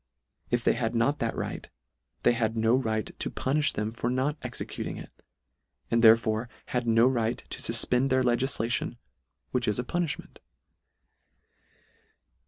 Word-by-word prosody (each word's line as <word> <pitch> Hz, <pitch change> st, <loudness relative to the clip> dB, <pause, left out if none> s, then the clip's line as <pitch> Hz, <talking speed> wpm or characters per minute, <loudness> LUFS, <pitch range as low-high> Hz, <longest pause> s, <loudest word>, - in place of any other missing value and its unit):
— -, -, -42 dB
If 120 Hz, -, -3 dB
they -, -, +4 dB
had 120 Hz, -1 st, -2 dB
not 125 Hz, +6 st, +2 dB
that 115 Hz, -1 st, -1 dB
right, -, -, -5 dB, 0.5 s
they -, -, +5 dB
had 115 Hz, -1 st, -1 dB
no 110 Hz, +2 st, +3 dB
right 110 Hz, -5 st, 0 dB
to -, -, -1 dB
punifh 150 Hz, +3 st, +1 dB
them 105 Hz, +1 st, -2 dB
for 120 Hz, +1 st, -2 dB
not 130 Hz, +4 st, 0 dB
executing 125 Hz, -2 st, -5 dB
it; -, -, -10 dB, 0.8 s
and 115 Hz, 0 st, +2 dB
there 110 Hz, 0 st, +9 dB
fore 110 Hz, +1 st, -2 dB, 0.2 s
had 125 Hz, -1 st, 0 dB
no 115 Hz, +2 st, +5 dB
right 120 Hz, -3 st, 0 dB
to -, -, -4 dB
fufpend 125 Hz, +3 st, +2 dB
their 130 Hz, 0 st, +3 dB
legiflation, 120 Hz, -1 st, 0 dB, 0.5 s
which 125 Hz, -1 st, -1 dB
is 105 Hz, -, +1 dB
a 125 Hz, -, -1 dB
puniihment. 170 Hz, +3 st, -3 dB
120 Hz, 155 wpm, -28 LUFS, 115-130 Hz, 0.8 s, there